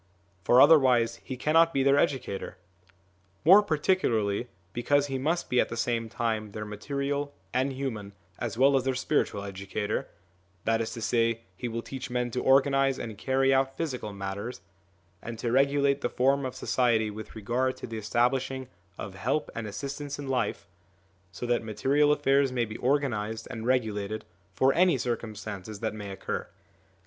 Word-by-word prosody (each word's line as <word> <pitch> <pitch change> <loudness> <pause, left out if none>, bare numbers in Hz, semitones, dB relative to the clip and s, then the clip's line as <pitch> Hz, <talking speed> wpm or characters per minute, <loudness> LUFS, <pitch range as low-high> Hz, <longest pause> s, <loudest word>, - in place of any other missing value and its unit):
For 120 +5 +5
otherwise 125 -6 +6
he 130 - -7
cannot 165 +4 +3
be 135 - +3
their 140 +1 +4
educator. 125 -10 -1 0.9
More 190 +6 +9
particularly 145 - +1 0.3
because 140 +4 +2
he 135 -2 -3
must 165 +6 0
be 125 - +2
at - - -2
the 115 - -5
same 115 -1 -1
time 110 -3 -2
their 105 0 -5
material 140 +7 -3 0.2
and 130 +2 +1
human 115 -7 -4 0.3
as 115 -1 -3
well 135 +2 +5
as 130 - +2
their 130 0 0
spiritual 125 -6 0
educator; 100 +1 -3 0.6
that 115 0 +2
is 115 - -3
to 115 - -6
say, 115 -1 +1
he 125 - -4
will 115 0 -4
teach 130 -2 -6
men 125 -1 -1
to 125 - -2
organise 135 0 +4
and 115 -4 -6
carry 135 +4 +2
out 135 0 +1
physical 130 -10 -3
matters, 100 +4 -5 0.6
and 120 -1 -6
to 115 +1 -2
regulate 140 +1 +3
the 120 - 0
form 135 +1 +2
of 130 - -8
society 120 -4 +1
with 110 +2 -9
regard 120 +5 -1
to - - -7
the 115 -2 -5
establishing 125 +4 0 0.3
of 100 - -6
help 120 +10 -1
and 115 -2 -4
assistance 140 +6 -5
in 145 -1 -6
life, 125 -9 -1 0.6
so 90 +8 -6
that 120 -1 +1
material 140 +7 +2
affairs 140 -2 +3
may 120 -2 0
be 110 0 -8
organised 115 -5 0
and 115 +1 -5
regulated 110 -4 -1 0.3
for 135 +1 +4
any 175 -4 +4
circumstances 110 -4 -5
that 110 0 -2
may 105 -2 -7
occur. 95 - -4
125 Hz, 165 wpm, -28 LUFS, 110-135 Hz, 0.9 s, More